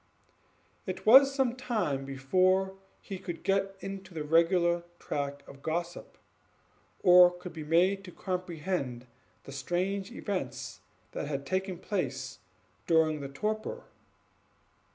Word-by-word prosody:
It 185 - -5
was 270 +5 +9
some 265 -3 +1
time 210 - -1
before 185 +8 +2 0.3
he 195 -3 -7
could 175 -3 -6
get 195 +1 +1
into 195 -2 -7
the 155 - -2
regular 170 +2 +3 0.2
track 140 0 -4
of 140 0 -13
gossip, 170 +3 -4 0.9
or 180 0 +9
could 180 0 -9
be 160 -1 -6
made 180 +5 +3
to 180 - -9
comprehend 175 -9 -3 0.4
the - - -10
strange 185 - -2
events 180 - -4 0.3
that - - -4
had 140 -1 -3
taken 185 +2 -2
place 190 +1 -3 0.5
during 160 -2 +3
his 140 - -5
torpor. 215 +6 -3
180 Hz, 120 wpm, -30 LUFS, 150-195 Hz, 0.9 s, was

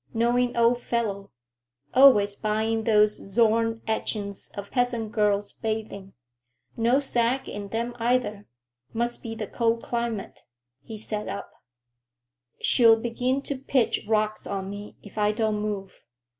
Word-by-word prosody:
Knowing 240 +1 +2
old 235 +1 +3
fellow. 205 -5 -2 0.6
Always 250 -7 +7
buying 220 +1 -1
those 210 -2 +5 0.2
Zorn 225 +1 +2
etchings 205 -2 -3
of 200 0 -7
peasant 240 -3 0
girls 205 -2 +1
bathing. 215 -3 -4 0.6
No 235 +3 +3
sag 255 -1 0
in 205 -1 -6
them 235 +3 -3
either. 230 -3 0 0.5
Must 240 +1 -2
be 225 -1 -6
the 220 -1 -4
cold 230 +2 0
climate." 235 -4 -3 0.4
He 220 +9 -8
sat 210 0 -4
up. - - -6 1.1
"She'll 225 -2 +5
begin 250 +4 -1
to 280 - -3
pitch 260 -2 0
rocks 215 -1 0
on 195 -1 -4
me 205 +1 -8
if 205 +1 -8
I 210 0 +3
don't 215 -1 0
move." 200 -2 -5
225 Hz, 130 wpm, -26 LUFS, 210-235 Hz, 1.1 s, Always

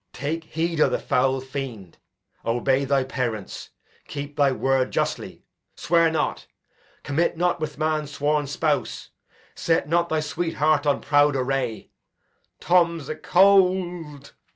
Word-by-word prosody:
Edg. - - -53
Take 155 +5 -3
heed 165 0 -2
o' - - +5
th' - - -1
foul 130 +1 +1
fiend; 130 -9 -7 0.4
obey 130 +4 +1
thy 135 -1 +2
parents: 120 -6 -4 0.4
keep 145 0 -6
thy 140 -2 +3
word 130 0 +1
justly; - - -3 0.3
swear 165 0 +3
not; 160 - -2 0.6
commit 160 +4 0
not 175 0 +1
with 155 -1 -5
man's 155 -1 -1
sworn 145 0 0
spouse; 140 - -2 0.4
set 165 -3 0
not 170 +2 +1
thy 160 - +1
sweet 165 +2 -3
heart 150 0 +2
on 145 - +2
proud 145 0 +3
array. 130 -3 -2 0.7
Tom 170 -1 +2
's 140 - -10
acold. 180 -4 +2
150 Hz, 135 wpm, -24 LUFS, 135-165 Hz, 0.7 s, o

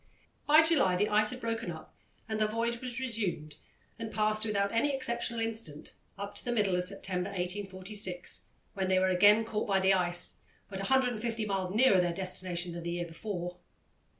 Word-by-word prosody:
By 305 +2 +7
July 290 - +3
the 205 +3 +1
ice 215 0 +3
had 250 - -6
broken 225 -4 -3
up 160 -2 -9 0.3
and 220 -1 -3
the 215 - +3
voyage 230 +2 -2
was 250 -1 -5
resumed 200 - -3 0.4
and 225 -1 -5
passed 215 0 +2
without 200 -2 0
any 275 +5 +1
exceptional 235 -2 -2
incident, 225 -10 -3 0.2
up 200 +1 -6
to 205 - -2
the 245 - -2
middle 205 -6 +1
of 180 - +1
September 185 -1 -2
1846, 185 0 -3 0.3
when 190 -1 -2
they 185 0 +3
were 190 0 +3
again 205 +4 +5
caught 215 -1 -2
by 195 -2 +2
the 190 0 +4
ice, 175 -2 +4 0.3
but 195 - -5
150 230 -1 0
miles 195 -3 -1
nearer 215 -1 +4
their 175 -1 0
destination 180 -2 -3
than 170 0 -6
the 170 - -4
year 175 0 -2
before. 175 +1 -5
200 Hz, 180 wpm, -31 LUFS, 180-225 Hz, 0.4 s, By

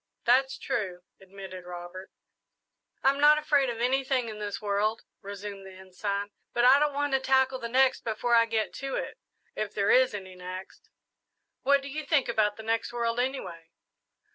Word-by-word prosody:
"That's 265 +3 +3
true," 190 -9 -3 0.2
admitted 190 -1 -10
Robert. 180 +1 -8 0.9
"I'm 275 +1 +3
not 300 +1 +7
afraid 295 -3 +2
of 235 - -4
anything 260 0 +1
in 215 -1 -8
this 205 -1 -4
world," 210 +1 -1 0.2
resumed 200 -1 -7
the 190 0 -11
Ensign; 200 +2 -4 0.2
"but 240 0 +2
I 265 +3 +7
don't 295 -1 +1
want 290 -1 -1
to 270 - +4
tackle 265 0 +2
the 235 -2 -5
next 260 +1 +3
before 230 +2 -1
I 230 0 +5
get 220 -1 -1
to 270 0 -3
it - - -5 0.4
if 215 -1 -4
there 200 -1 +2
is 255 -4 +4
any 190 -2 -8
next." 185 +1 -9 0.7
"What 280 +1 +3
do - - -6
you 305 +3 -5
think 285 -2 +2
about 215 -3 +1
the 220 - -8
next 225 +1 -1
world, 235 0 -1
anyway?" 185 -11 -3
230 Hz, 175 wpm, -28 LUFS, 200-265 Hz, 0.9 s, not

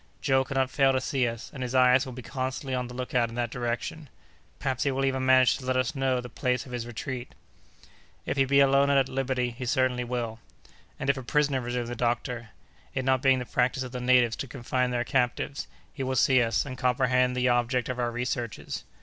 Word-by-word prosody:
Joe 135 -2 +2
cannot 135 -1 -1
fail 135 -1 +3
to 130 - +2
see 130 -1 0
us, 115 -1 -6
and 135 - -7
his 125 0 -3
eyes 130 +1 +5
will 130 - -7
be 125 0 -8
constantly 130 +1 -4
on 125 -1 -1
the 125 - -9
lookout 125 -2 0
in 115 - -9
that 120 -1 -2
direction. 125 +4 -4 0.5
Perhaps 130 - -2
he 140 - +2
will 135 0 0
even 130 -1 0
manage 130 -1 +5
to 130 - -9
let 130 0 +1
us 130 +5 0
know 135 -3 0
the 125 - -6
place 125 +1 -1
of 130 - -11
his 120 -1 -4
retreat." 120 +2 -6 0.9
"If - - -1
he 135 -1 +3
be 140 +1 +4
alone 140 +1 +4
and 140 - +4
at 135 -1 +3
liberty, 130 -2 -1
he 125 +1 -6
certainly 125 0 +1
will." 120 -2 -3 0.6
"And 135 - -3
if 140 0 +3
a - - -4
prisoner," 140 +1 +1
resumed 120 0 -3
the 120 - -4
doctor, 120 0 -2 0.5
"it 130 -1 -1
not 130 -1 +2
being 135 -1 +4
the 125 - -4
practice 125 +2 0
of 125 - -7
the 125 0 -5
natives 125 -2 +4
to 135 - -4
confine 125 0 -1
their 120 -1 0
captives, 125 +2 -1 0.3
he 140 - -6
will 130 0 -1
see 130 +1 +4
us, 115 +1 +1
and 130 -2 -7
comprehend 125 0 +2
the 125 0 +2
object 120 0 +1
of 125 -1 -4
our 120 -1 +1
researches." 120 -1 -4
125 Hz, 225 wpm, -27 LUFS, 120-130 Hz, 0.9 s, eyes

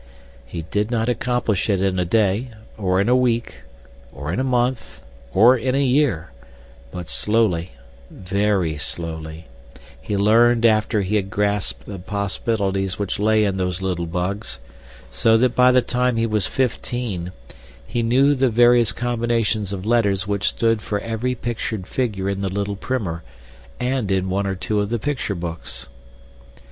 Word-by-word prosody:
He 80 +6 -6
did 105 +6 -1
not 115 -1 0
accomplish 120 -5 0
it 100 -2 +2
in 95 -1 0
a 90 - +1
day, 105 +4 +1 0.3
or 95 -3 0
in 100 - +1
a 125 - +4
week, 120 -2 0 0.5
or 70 +4 -5
in - - -1
a - - +1
month, 125 -1 -1 0.3
or 115 - +6
in 130 +2 -1
a 140 - +2
year; 125 - +1 0.6
but 90 +4 -7
slowly, 105 -6 +1 0.4
very 95 -4 -1
slowly, 80 +1 -5 0.6
he 105 - -2
learned 115 +3 +4
after 110 -1 +3
he 105 +3 +1
had 95 -2 -2
grasped 105 0 -1
the 100 -2 -7
possibilities 100 0 -2
which 100 -1 -3
lay 110 +1 +3
in 95 -1 -1
those 90 -1 -1
little 90 -3 -2
bugs, 90 +5 -3 0.5
so 110 - +3
that 125 +1 +2
by 125 0 +6
the 125 -1 +4
time 125 -1 0
he 115 - +2
was 110 -3 0
fifteen 120 -7 -2 0.5
he 120 - -2
knew 130 +5 +4
the 135 -2 +2
various 120 0 +5
combinations 115 -4 -1
of 95 -1 -5
letters 105 -5 +2
which 100 0 0
stood 115 -2 +1
for 105 - -2
every 115 +3 -2
pictured 115 -4 -4
figure 105 -5 -2
in 100 0 -2
the 100 - -1
little 100 +1 -2
primer 100 -7 -3 0.6
and 125 -4 -1
in 95 -1 0
one 100 +1 0
or 95 - -1
two 105 +3 -1
of 105 0 -1
the 120 - 0
picture 130 -4 -2
books. 85 -2 -5
105 Hz, 160 wpm, -21 LUFS, 95-120 Hz, 0.6 s, or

